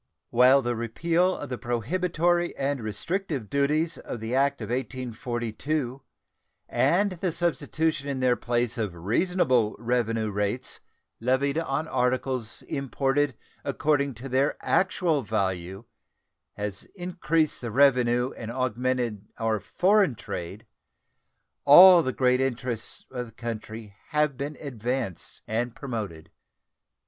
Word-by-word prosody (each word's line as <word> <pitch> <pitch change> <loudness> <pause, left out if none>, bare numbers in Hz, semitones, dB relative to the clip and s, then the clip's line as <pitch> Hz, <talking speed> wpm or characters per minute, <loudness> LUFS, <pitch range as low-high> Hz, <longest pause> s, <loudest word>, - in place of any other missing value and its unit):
While 130 +3 +6
the 120 0 -1
repeal 170 +11 +1
of 145 - -7
the 125 - -4
prohibitory 175 - 0
and 140 -1 -1
restrictive 130 - -3
duties 150 +4 +1
of 120 - -6
the 110 +2 -4
act 140 +1 +2
of - - -6
1842 125 +1 -3 0.7
and 170 +12 +2
the 180 0 -2
substitution 160 -3 -1
in 135 -2 -2
their 125 -1 +3
place 120 -1 -1
of 105 -6 -2
reasonable 120 - +1
revenue 115 -2 0
rates 105 +5 -2 0.4
levied 130 +5 +1
on 155 0 -2
articles 125 -3 -1
imported 135 0 0 0.3
according 140 -3 0
to 125 +5 -8
their 135 +3 +1
actual 175 -5 +1
value 95 -2 -2 0.7
has 105 -1 -4
increased 170 -4 0
the 120 - -4
revenue 125 0 +3
and 115 - -7
augmented 125 -3 -1
our 110 -1 0
foreign 195 - +2
trade, 100 0 -6 1.0
all 175 +5 +10
the 130 - -1
great 125 0 +2
interests 125 -3 -3
of 125 -2 -4
the - - -14
country 110 -2 -7 0.2
have 150 -2 +1
been 140 +3 -5
advanced 125 - -4
and 115 +2 -2
promoted. 105 - -6
130 Hz, 120 wpm, -26 LUFS, 115-145 Hz, 1.0 s, all